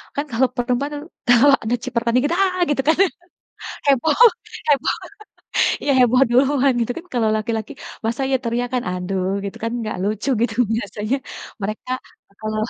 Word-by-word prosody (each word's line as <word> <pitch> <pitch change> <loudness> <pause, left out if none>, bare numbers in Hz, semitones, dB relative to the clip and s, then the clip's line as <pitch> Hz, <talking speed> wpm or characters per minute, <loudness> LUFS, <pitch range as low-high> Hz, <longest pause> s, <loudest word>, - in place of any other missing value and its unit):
kan 285 - -1
kalau 255 +3 +3
perempuan 250 +4 -1 0.4
kalau 265 +4 +6
ada 230 +2 0
cipratan 235 0 -1
dikit, 290 +6 +1
"Ah!" 370 -1 +1
gitu 280 -2 +1
kan, 320 - +4 0.9
heboh 285 +2 +3 0.5
heboh, 280 -3 +3 0.9
iya, 285 - +1
heboh 250 +1 +4
duluan 270 +2 +3
gitu 230 - -1
kan, 340 - -8
kalau 225 -3 +2
laki-laki 220 0 -3 0.3
masa 235 +4 -1
ya 265 - +4
teriakan, 245 +1 -1
aduh, 180 +1 -2 0.2
gitu 195 - -6
kan 230 - 0
nggak 215 -1 -3
lucu 215 +6 -2
gitu 230 -3 0 0.2
biasanya 215 +3 -2 0.5
mereka 215 +5 -5 0.5
kalo 215 0 -3
245 Hz, 145 wpm, -21 LUFS, 220-275 Hz, 0.9 s, kalau